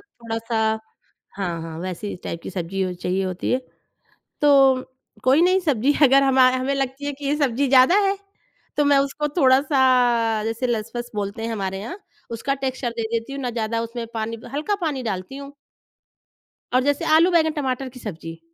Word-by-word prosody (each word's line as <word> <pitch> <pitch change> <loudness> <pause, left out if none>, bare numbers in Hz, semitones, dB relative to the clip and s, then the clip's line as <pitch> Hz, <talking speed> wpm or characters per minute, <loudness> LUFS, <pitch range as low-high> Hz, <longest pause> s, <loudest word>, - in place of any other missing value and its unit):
थोड़ा-सा 230 - -5 0.8
हाँ, 175 -4 -3
हाँ, 160 -1 -7
वैसी 185 +3 -5
ही - - -4
टाइप 170 - -5
की - - -5
सब्ज़ी 190 +1 -3
ओ - - -4
चाहिए 180 +2 -2
होती 185 -1 -3
है। 255 - +2 0.8
तो 270 -3 +5 0.4
कोई 270 +5 +5
नहीं, 370 +2 +4
सब्ज़ी 285 -4 +2
अगर 275 0 +6
हमा 260 -1 +5
हमें 265 +2 -1
लगती 270 +1 -3
है 290 - -1
कि 280 +1 -10
ये 290 - +1
सब्ज़ी 275 -2 +1
ज़्यादा 260 +5 +6
है, 395 +1 +1 0.6
तो 295 - +3
मैं 285 -1 +4
उसको 280 +2 -1
थोड़ा-सा, 255 -6 +3
जैसे 225 +3 -2
लस-फस 240 +1 -3
बोलते 205 +2 -4
हैं 230 - -2
हमारे 195 -2 -3
यहाँ, 245 - -7 0.3
उसका 250 +4 -2
टेक्सचर 260 -2 -2
दे 230 - -1
देती 230 +4 -2
हूँ, 275 - -5
ना 245 - -2
ज़्यादा 230 -1 -2
उसमें 230 0 -5
पानी 225 0 -3
ब 225 - -12
हल्का 310 +8 0
पानी 280 -5 -2
डालती 195 +2 -4
हूँ। 280 0 -9 1.2
और 255 - +3
जैसे 285 +4 0
आलू, 340 +3 +5
बैंगन, 320 -2 +3
टमाटर 260 0 -2
की 250 0 -13
सब्ज़ी। 165 -5 -7
255 Hz, 185 wpm, -22 LUFS, 220-275 Hz, 1.2 s, अगर